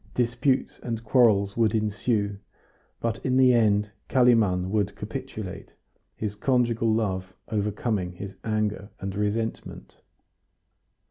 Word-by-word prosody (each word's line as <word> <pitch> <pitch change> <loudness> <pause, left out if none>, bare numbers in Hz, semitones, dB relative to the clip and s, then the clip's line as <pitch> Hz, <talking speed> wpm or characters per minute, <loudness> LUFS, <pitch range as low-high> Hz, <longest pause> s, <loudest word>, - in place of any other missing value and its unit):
Disputes 125 +3 0
and 115 -2 -4
quarrels 105 -5 +3
would 115 -1 +2
ensue, 105 -1 0 0.6
but 115 -1 -2
in 130 -1 +1
the 130 -1 +6
end 105 -3 +3 0.2
Kalimann 110 -8 +3
would 100 -2 0
capitulate, - - -7 0.4
his 105 -2 -3
conjugal 115 0 +1
love 95 -4 -1
overcoming 105 -3 -1
his 95 +2 -7
anger 105 -2 -1
and 95 0 -4
resentment. 105 +2 -3
110 Hz, 110 wpm, -26 LUFS, 100-115 Hz, 0.6 s, the